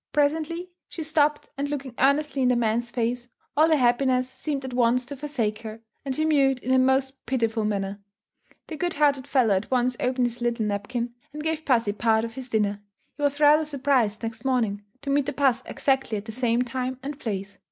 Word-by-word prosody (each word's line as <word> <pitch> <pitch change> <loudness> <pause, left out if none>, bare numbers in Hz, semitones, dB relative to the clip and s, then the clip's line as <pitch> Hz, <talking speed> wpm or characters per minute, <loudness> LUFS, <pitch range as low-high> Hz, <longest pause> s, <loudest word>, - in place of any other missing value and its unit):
Presently, 320 +4 0 0.2
she 325 - -5
stopped 300 -1 +1
and 285 +1 -1
looking 275 -3 -4
earnestly 280 0 +2
in 255 - +3
the 250 - +3
man's 235 0 0
face, 240 +1 -2 0.3
all 310 +2 +5
her 315 - +5
happiness 255 0 +2
seemed 275 +1 -4
at 260 - -6
once 245 0 +2
to 285 +3 -7
forsake 255 -7 -2
her 220 0 -8 0.2
and 270 -2 -3
she 310 - +1
mewed 275 -4 +3
in 260 - +1
a 260 - +5
most 265 +1 +1
pitiful 230 -4 0
manner. 200 -1 -2 0.7
The 315 - -7
good 350 0 -1
hearted 285 -3 +2
fellow 245 -7 +3
at 190 +2 -1
once 250 -1 +1
opened 250 0 +1
his 240 0 -4
little 235 -2 0
napkin, 235 +4 -3 0.2
and 300 0 -6
gave 320 0 -2
pussy 230 -6 +2
part 220 +1 +2
of 230 - -7
his 260 0 -7
dinner. 205 -3 0 0.3
He 290 - -10
was 285 0 +1
rather 300 +1 +6
surprised 265 -7 +1
next 225 0 -5
morning, 235 -6 0 0.2
to 280 - -2
meet 280 -1 +2
the 290 - -2
puss 265 -3 +2
exactly 265 -5 0
at 200 - -7
the 220 - -6
same 240 +1 +1
time 255 +1 -3
and 285 +1 -5
place. 200 -4 -5
255 Hz, 205 wpm, -25 LUFS, 230-285 Hz, 0.7 s, rather